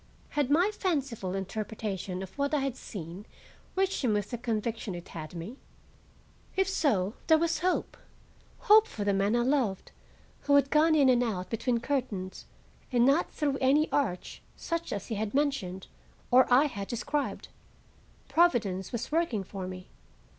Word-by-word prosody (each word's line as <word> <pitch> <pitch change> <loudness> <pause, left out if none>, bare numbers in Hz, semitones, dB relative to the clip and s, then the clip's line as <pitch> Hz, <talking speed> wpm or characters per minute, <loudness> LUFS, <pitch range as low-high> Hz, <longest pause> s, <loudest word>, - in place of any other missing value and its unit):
Had 290 -3 0
my 350 +8 +4
fanciful 270 - -2
interpretation 195 -1 -4
of 190 - -10
what 285 +1 0
I 290 - +1
had 270 -2 -2
seen 185 -4 -8 0.5
reached 385 -4 0
him 235 -4 +2
with 205 +1 -1
the 240 - -2
conviction 225 -3 -2
it 175 - -9
had 155 0 -8
me? 180 +10 -7 1.0
If 385 -1 +2
so, 215 - +1
there 320 - +6
was 335 +1 0
hope,—hope 420 +4 +1
for 210 - -5
the 200 0 +2
man 200 +3 +2
I 240 - +2
loved, 245 -8 0 0.5
who 285 - +4
had 275 -1 +4
gone 315 +2 +5
in 285 -3 +5
and 250 -1 +4
out 200 -7 -2
between 235 +1 0
curtains, 235 -9 -3 0.4
and 240 -1 +4
not 280 +6 +3
through 285 -3 -1
any 285 +4 +3
arch 220 -11 -1
such 335 0 -3
as 200 - -3
he - - -5
had 215 +3 -3
mentioned 270 -11 -1 0.5
or 255 0 +5
I 260 +4 +6
had 200 -9 -4
described. 285 +5 -3 0.8
Providence 215 - +2
was 240 +1 -4
working 310 - +1
for 190 -1 -6
me. 185 0 -8
240 Hz, 160 wpm, -29 LUFS, 195-290 Hz, 1.0 s, there